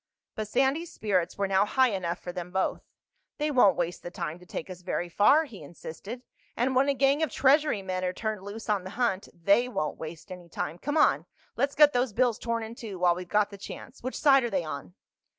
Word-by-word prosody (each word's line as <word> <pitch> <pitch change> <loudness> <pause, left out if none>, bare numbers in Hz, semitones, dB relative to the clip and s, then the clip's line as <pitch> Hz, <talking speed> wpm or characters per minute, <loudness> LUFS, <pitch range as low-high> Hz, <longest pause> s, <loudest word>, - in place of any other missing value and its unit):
But 215 -1 -4
Sandy's 270 +9 +1
spirits 190 -5 -1
were 200 0 0
now 190 0 +3
high 255 +4 +3
enough 180 -4 -2
for 175 - -7
them 180 -1 -6
both. 190 +1 -1 0.6
"They 300 0 0
won't 225 -9 +5
waste 175 0 -2
the - - -6
time 170 -1 -5
to 180 - -16
take - - -5
us 180 -1 -9
very 175 -1 -2
far," 245 - +5
he 230 - -11
insisted. 175 - -9 0.3
"And 255 +2 +1
when 270 +2 +4
a 280 - +2
gang 275 +3 +3
of 315 - +1
Treasury 275 -5 +3
men 185 -1 -3
are 180 - 0
turned 215 +1 -3
loose 205 +3 -8
on 205 -4 +1
the 185 - -7
hunt, 215 -6 0
they 200 +8 +2
won't 155 -11 -3
waste 160 +4 -8
any 180 -2 -9
time. 165 +1 -4
Come 290 +3 -2
on. 305 - +3 0.3
Let's 280 +1 0
get 295 -1 +7
those 245 -2 +1
bills 245 -1 +2
torn 230 -1 -2
in 220 +1 -7
two 220 -5 -7
while 175 -1 +4
we've 180 0 -7
got 210 +1 +2
the 200 - -10
chance. 250 +6 -9
Which 255 +2 -4
side 275 -3 +5
are 240 - -1
they 190 -5 0
on?" 155 +3 -7
205 Hz, 230 wpm, -28 LUFS, 180-255 Hz, 0.6 s, get